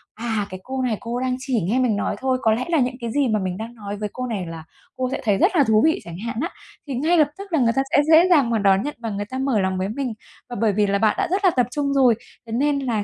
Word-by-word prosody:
"À, 220 -3 -2
cái 185 0 -7
cô 260 0 -4
này 235 -5 0
cô 235 -1 -4
ấy 255 - -2
đang 255 -1 0
chỉ 260 -5 -1
nghe 210 +10 0
mình 245 -5 +2
nói 200 - -1
thôi, 260 -1 +1
có 220 - +3
lẽ 245 +3 -2
là 330 - +2
những 250 -1 0
cái 235 -1 -3
gì 285 0 +1
mà 215 -2 +1
mình 185 -1 -3
đang 230 +2 -7
nói 205 -2 -6
với 210 0 -3
cô 255 - -4
này 205 -7 -3
là 165 -1 -7 0.3
cô 255 -1 -1
sẽ - - -3
thấy 205 -4 +2
rất 365 - +2
là 290 - +5
thú 220 -3 +3
vị" 320 - +2
chẳng 170 0 -8
hạn 235 - -3
á, 335 - -1 0.4
thì 270 - -3
ngay 325 +7 +2
lập 305 - +5
tức 395 -2 -9
là 315 - +3
người 230 -2 +3
ta 270 - +3
sẽ 290 - +5
dễ 335 +3 +7
dàng 285 -9 +4
mà 230 - +1
đón 195 0 +3
nhận 295 - -4
và 230 -1 -4
người 205 0 -3
ta 260 +5 -6
mở 265 -5 +1
lòng 190 0 0
với 190 +1 -2
mình. 250 +1 -3 0.4
Và 240 - -6
bởi 215 -3 +3
vì 205 0 +2
là 200 0 +1
bạn 220 -1 +3
đã - - 0
rất 390 +1 +1
là 365 - +6
tập 250 -6 +1
trung 280 -1 -1
rồi, 255 -4 +4 0.3
thế - - -8
nên 280 +4 +1
là 235 -6 -1
240 Hz, 320 wpm, -22 LUFS, 210-270 Hz, 0.4 s, dễ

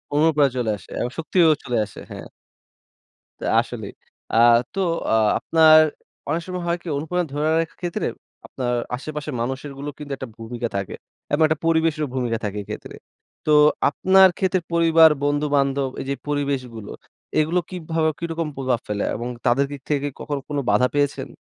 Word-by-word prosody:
অনুপ্রেরণা 150 -2 +3
চলে 120 -3 0
আসে - - -18
এবং 120 - -1
শক্তিও 165 +1 +3 0.2
চলে 125 -1 -1
আসে। 100 - -12
হ্যাঁ। - - -8 1.1
তো - - -6
আসলেই। - - -4 0.4
আ - - +2 0.4
তো - - -3 0.3
অ - - +3 0.3
আপনার 160 -1 +6 0.5
অনেক 160 +3 0
সময় 180 -1 -4
হয় 170 0 +1
কি - - -12
অনুপ্রেরণা 170 +4 -2
ধরে 150 +1 0
রাখার 165 - -7
ক্ষেত্রে 175 -1 -2 0.4
আপনার 125 -2 -3 0.2
আশেপাশের 150 +2 -6
মানুষেরগুলো 135 +3 -4
কিন্তু 150 -1 -8
একটা 130 - -6
ভূমিকা 120 +1 -4
থাকে 100 -1 -4 0.4
এবং 145 - +1
একটা 155 -1 -1
পরিবেশেরও 160 -2 +2
ভূমিকা 120 -3 0
থাকে 105 0 -4
এইক্ষেত্রে। 100 - -8 0.5
তো 155 - +1 0.4
আপনার 190 +5 +5
ক্ষেত্রে 185 -1 +1
পরিবার, 165 -1 +6
বন্ধু, 145 +1 +1
বান্ধব 140 -1 +1
এইযে 140 +1 -3
পরিবেশগুলো, 135 -7 -3 0.5
এগুলো 160 +4 +2
কীভাবে 165 -3 -1
কিরকম 165 -1 -3
প্রভাব 130 -3 0
ফেলে? 105 -1 -2
এবং 120 +2 -4 0.2
তাদের 130 +3 +3
দিক 140 -2 -7
থেকে 145 -1 0
কখনো 145 -2 -4
কোনো 145 -1 -1
বাধা 125 - +4
পেয়েছেন? 145 -1 0
145 Hz, 155 wpm, -22 LUFS, 130-165 Hz, 1.1 s, আপনার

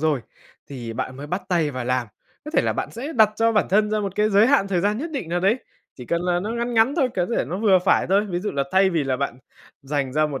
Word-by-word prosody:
rồi 150 -4 +1 0.5
thì 120 -5 -6
bạn 130 +3 -4
mới 140 +2 -7
bắt 180 +6 -3
tay 165 -5 +1
vào 130 -2 -5
làm, 125 -1 0 0.4
có 300 - -6
thể - - +2
là - - 0
bạn - - -4
sẽ 275 +8 -6
đặt 220 -4 +5
cho 225 0 +2
bản 210 - +2
thân 210 +2 +2
ra 215 0 0
một 200 -2 -3
cái 210 +1 +2
giới 205 +3 +5
hạn 265 -8 +3
thời 185 -3 +1
gian 210 +4 0
nhất 320 +4 -4
định 260 - -4
nào 175 +1 -1
đấy, 200 +7 +2 0.4
chỉ 125 - -8
cần 170 +5 0
là 175 -1 0
nó 210 +4 -4
ngắn 235 +1 -2
ngắn 225 +5 +3
thôi, 265 -5 +2
có 180 -1 +1
thể - - +1
nó 180 - -4
vừa 205 -4 +4
phải 180 +1 +2
thôi. 200 +2 +2
Ví 175 - -1
dụ 205 +4 -3
là 140 -1 -1
thay 190 0 +4
vì 165 -5 0
là 130 -1 0
bạn 130 -2 -3 0.4
dành 135 -2 -2
ra 155 +1 +2
một 140 -3 -5
185 Hz, 295 wpm, -23 LUFS, 145-215 Hz, 0.5 s, đặt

